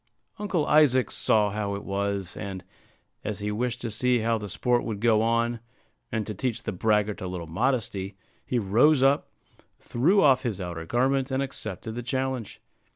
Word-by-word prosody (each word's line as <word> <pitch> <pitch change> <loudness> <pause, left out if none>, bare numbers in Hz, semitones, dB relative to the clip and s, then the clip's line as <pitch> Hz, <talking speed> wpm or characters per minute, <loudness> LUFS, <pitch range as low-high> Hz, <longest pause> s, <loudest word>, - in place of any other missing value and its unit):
Uncle 190 -7 0
Isaac 130 -7 +4
saw 105 -2 +2
how 100 -1 -2
it 100 - -6
was; 100 -1 -2
and, 95 -2 -6 0.6
as 105 -2 -3
he 105 0 -3
wished 120 +3 -2
to 115 - -3
see 125 +2 +2
how 115 0 +1
the 105 -1 -6
sport 120 +4 +1
would 110 -3 -4
go 110 -1 +3
on, 115 +1 +1 0.5
and 110 -2 -1
to 105 - -4
teach 115 +3 -3
the - - -2
braggart 105 +2 +1
a 95 - -3
little 90 -2 -5
modesty, 100 0 -1 0.3
he 125 - -1
rose 120 +7 +4
up, 140 +2 +3 0.5
threw 170 +12 +2
off 135 -3 +5
his 115 -6 -3
outer 85 -3 -5
garment, 130 - +1
and 130 +1 0
accepted 110 -4 -5
the 120 - -4
challenge. 130 -2 -3
115 Hz, 175 wpm, -26 LUFS, 100-130 Hz, 0.6 s, off